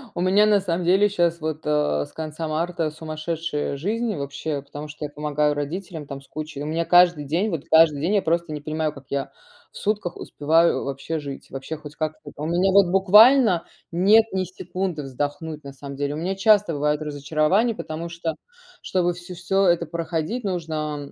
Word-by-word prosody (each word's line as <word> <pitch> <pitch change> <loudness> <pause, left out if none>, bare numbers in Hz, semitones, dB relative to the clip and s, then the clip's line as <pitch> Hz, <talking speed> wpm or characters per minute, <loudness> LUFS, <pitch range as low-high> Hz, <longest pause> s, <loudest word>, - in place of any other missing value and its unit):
у - - -2
меня 195 +4 +4
на 210 -1 +5
самом 180 -2 -2
деле 190 +4 +5
щас 170 -4 +1
вот, 155 -1 -3
а, 150 - +1
с - - -18
конца 160 0 -5
марта 165 +1 -1
сумасшедшая 155 -1 -4
жизнь, 215 +7 -1
вообще, 140 0 -4
потому 145 +1 -8
что 150 0 -7
я - - -5
помогаю 150 0 0
родителям 155 +2 -5
там 140 -1 -6
с 135 - -19
кучей 155 -2 -6
и - - -3
у - - -4
меня 160 +2 -1
каждый 175 -4 +5
день, 175 +9 0
вот 160 -4 -3
каждый 160 -3 +5
день 180 +7 +1
я 200 - +3
просто 170 0 0
не 150 - -4
понимаю, 155 +1 -2
как 140 -2 -13
я 140 -1 -2 0.4
в - - -12
сутках 205 -4 -2
успеваю, 165 +3 +2
э, - - -5
вообще 140 +4 -4
жить, 140 -2 -8
вообще 135 +4 -5
хоть 150 0 -11
как-то. 155 -1 -4
Та 145 - -9
у 155 - -2
меня 180 +3 +2
вот, 195 -1 +6
буквально, 205 +2 +6 0.3
нет 200 +6 +5
ни 190 -1 +1
секунды 180 -2 -4
вздохнуть, 145 +3 -4
на 140 -1 -9
самом 140 +1 -8
деле. 145 +1 -2
У - - -5
меня 180 +4 -2
часто 205 -3 +4
бывает 150 +1 0
разочарование, 155 - +1
потому 165 -1 -5
что, 170 -1 -3 0.5
чтобы 175 -1 0
всё-всё 180 +2 -1
это 170 -1 +3
проходить, 165 +7 -3
нужно 155 -6 -3
160 Hz, 195 wpm, -23 LUFS, 150-180 Hz, 0.5 s, вот